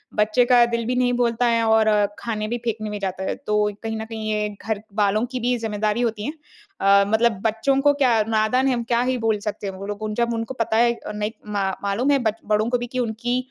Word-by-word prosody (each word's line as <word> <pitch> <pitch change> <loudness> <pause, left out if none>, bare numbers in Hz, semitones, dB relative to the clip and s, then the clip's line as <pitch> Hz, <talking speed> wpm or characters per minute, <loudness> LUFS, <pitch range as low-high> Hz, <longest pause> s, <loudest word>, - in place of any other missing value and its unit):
बच्चे 215 +4 +3
का 240 -1 +7
दिल 235 -1 -2
भी 250 +2 -1
नहीं 250 0 +2
बोलता 240 0 +1
है 230 -1 +2
और 220 0 +4 0.3
खाने 215 -2 -3
भी 240 +2 -2
फेंकने 215 -2 -2
में 210 - -4
जाता 190 -1 -3
है, - - -2
तो 210 0 0
कहीं 225 0 -3
न - - -5
कहीं 220 -1 -5
ये 210 0 0 0.2
घरवालों 215 0 0
की 255 - -3
भी 245 +1 0
जिम्मेदारी 215 0 -1
होती 220 -3 -1
है। 295 - -3 0.5
अ, 200 0 +5
मतलब 220 -1 +2
बच्चों 225 +5 +1
को 290 +1 +4
क्या 255 -6 +3
नादान 225 +4 +2
है 265 - +2
हम 235 -1 -2
क्या 235 0 +1
ही 255 +1 0
बोल 225 -2 +1
सकते 205 -1 -4
हैं? 195 - -4
वो 190 +1 -8
लोग 205 - -3 0.2
जब 235 0 +1
उनको 230 +2 -3
पता 230 -3 -1
है 235 +1 +4
अ, 235 - -8
नहीं 210 +1 -3 0.2
मा 200 -2 -1
मालूम 210 +8 +1
है 280 - +3
बच 225 -2 -1
बड़ों 215 +2 +1
को 245 - +2
भी 240 0 -5
कि 255 +1 -4
उनकी 240 +1 -1
225 Hz, 245 wpm, -22 LUFS, 210-240 Hz, 0.5 s, का